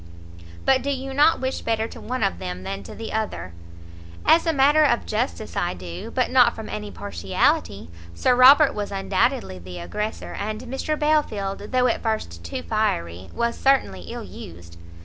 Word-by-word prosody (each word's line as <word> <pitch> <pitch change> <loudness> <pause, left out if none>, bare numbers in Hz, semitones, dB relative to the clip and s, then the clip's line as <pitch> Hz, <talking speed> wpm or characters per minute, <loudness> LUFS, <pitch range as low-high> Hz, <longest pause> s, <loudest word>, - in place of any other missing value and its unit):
"But 265 -1 +4
do 280 - -3
you 270 -1 -3
not 300 +4 +4
wish 260 0 -2
better 225 -1 0
to - - -11
one 255 +2 -3
of 85 - 0
them 90 +1 -5
than 95 +1 -4
to 95 - -10
the 225 - -6
other?" 215 - -3 0.7
"As 335 - +5
a - - +4
matter 295 +1 +5
of 240 -5 +2
justice 220 0 -3
I 175 - -1
do, 90 -1 -7
but - - 0
not - - +5
from - - -7
any 105 0 -5
partiality: 85 -2 -1 0.2
Sir 250 - +3
Robert 275 +4 +7
was 205 -1 -4
undoubtedly 185 - 0
the 90 0 -9
aggressor, 210 - -4
and 215 +2 -4
Mr 265 +5 -3
Belfield, 215 -11 0
though 255 -1 +3
at 245 - +1
first 85 - -3
too 85 0 -5
fiery, 85 +2 -1
was 235 0 -1
certainly 265 - +2
ill - - -6
used." 85 0 -11
215 Hz, 175 wpm, -23 LUFS, -, 0.7 s, Robert